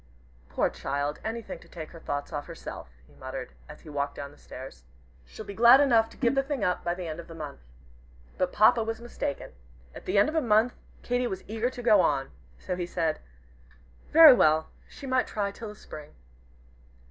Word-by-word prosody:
"Poor - - +1
child, 145 +1 -3
anything 225 0 -5
to - - -18
take 160 -3 -8
her 165 - -11
thoughts 145 +1 -4
off 145 -1 -4
herself!" - - -8 0.2
he - - -23
muttered, - - -7 0.2
as - - -11
he - - -13
walked 145 -1 -2
down 140 0 -8
stairs. 125 - -11 0.5
"She'll 220 - -10
be 200 - -7
glad 235 +5 +7
enough 230 -6 +4
to - - -17
give 240 -1 +2
the 270 - +3
thing 270 -4 -3
up 180 -2 0
by 175 0 -1
the 180 -2 -6
end 155 +1 -5
of 170 - -9
the 165 - -10
month." 150 -3 -7 0.8
But 185 -1 0
Papa 225 +2 +5
was 225 0 -4
mistaken. 235 -11 -5 0.4
At - - -11
the 190 - 0
end 200 - +6
of 310 - -3
a 320 - +2
month 230 0 +3 0.3
Katy 245 0 0
was 190 -4 -5
eager 225 +3 -1
to 250 -1 -9
go 215 -5 +6
on. 135 -4 0 0.3
So 180 - -4
he 175 -1 -3
said, 165 -3 -1 0.9
"Very 315 -3 +10
well 155 -8 +3 0.2
she 280 - -11
might 260 -1 +1
try 205 -2 -2
it - - -10
till 210 0 -8
Spring." 150 - -11
200 Hz, 205 wpm, -28 LUFS, 155-240 Hz, 0.9 s, Very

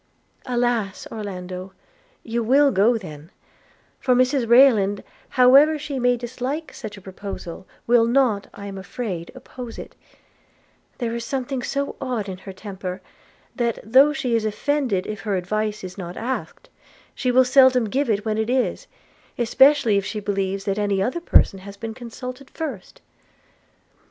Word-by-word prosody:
'Alas! 240 -5 -1
Orlando, 185 -3 -6 0.5
you 235 +1 -2
will 275 +5 +4
go 225 +3 +3
then: 155 -6 -10 0.7
for 255 -2 +2
Mrs 255 -1 +2
Rayland, 225 -6 +5 0.3
however 275 +5 +6
she 290 -2 -4
may 245 0 +2
dislike 255 +6 -4
such 210 -1 -8
a - - -12
proposal, 190 -2 -8 0.2
will 235 -1 +4
not, 235 -5 +2
I 200 - -10
am 195 -1 -6
afraid, 190 -3 -5
oppose 245 -3 -9
it: - - -9 1.0
there 235 -3 -2
is 235 0 -3
something 260 +1 -3
so 280 +3 -3
odd 245 -6 -2
in 185 -1 -6
her 195 - -9
temper, 190 -1 -6 0.6
that, 235 -3 0
though 265 +7 +6
she 255 -4 -2
is 225 - +1
offended 225 -2 0
if 210 -1 -5
her 205 -3 -1
advice 215 +3 -2
is 185 +1 -8
not 175 -1 -7
asked, 260 - -5 0.4
she 255 - -2
will 255 +1 +5
seldom 255 -2 +5
give 265 +5 -1
it 210 0 0
when 215 0 -1
it 220 +1 -1
is, 260 - 0 0.5
especially 265 -1 +4
if - - -5
she 210 +1 -4
believes 195 -1 -2
any 200 0 0
other 255 - -1
person 195 - +3
has 200 +1 -11
been 225 +2 -5
consulted 250 +3 -8
first.' 270 - -7
230 Hz, 150 wpm, -23 LUFS, 200-255 Hz, 1.0 s, however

